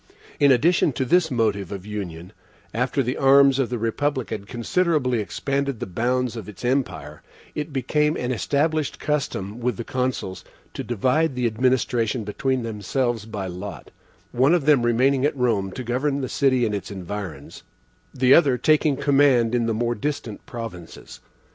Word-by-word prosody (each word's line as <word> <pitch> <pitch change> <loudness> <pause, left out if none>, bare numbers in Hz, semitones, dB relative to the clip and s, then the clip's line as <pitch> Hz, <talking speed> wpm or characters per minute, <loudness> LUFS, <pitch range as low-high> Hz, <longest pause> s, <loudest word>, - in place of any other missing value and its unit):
In 140 -1 +5
addition 155 +3 +3
to 130 - -1
this 175 +4 +3
motive 105 - 0
of 100 -1 -6
union, 90 -5 -6 0.4
after 125 +4 0
the 125 +2 -2
arms 135 0 +5
of 130 - +1
the 125 - -2
republic 130 +4 -1
had 100 -2 -5
considerably 130 +1 0
expanded 140 +4 -2
the - - -3
bounds 120 +6 -1
of 110 -3 -7
its 105 +4 -9
empire, 90 - -2 0.3
it 150 +1 -4
became 150 +3 0
an 125 0 -2
established 150 +4 0
custom 120 -8 -2
with 120 -3 -1
the - - -4
Consuls 125 -8 -3 0.3
to - - -5
divide 130 +6 +1
the 125 -1 -1
administration 120 -1 +1
between 130 +5 -1
themselves 115 +1 -2
by 105 -3 -5
lot 95 +2 -7 0.4
one 130 +7 +4
of 165 -6 -1
them 145 -4 +5
remaining 130 +3 +2
at 145 0 +1
Rome 110 -6 0
to 130 - -5
govern 135 +4 -1
the 130 - -3
city 130 -3 +2
and 105 - -1
its 100 - -4
environs, 100 0 -7 0.5
the 130 +1 +4
other 140 -7 +5
taking 155 +1 +3
the - - -7
command 135 -5 +4
in 120 -2 +1
the 115 - +1
more 120 +1 0
distant 120 -3 -4
provinces. 110 -8 -8
125 Hz, 165 wpm, -23 LUFS, 110-140 Hz, 0.5 s, In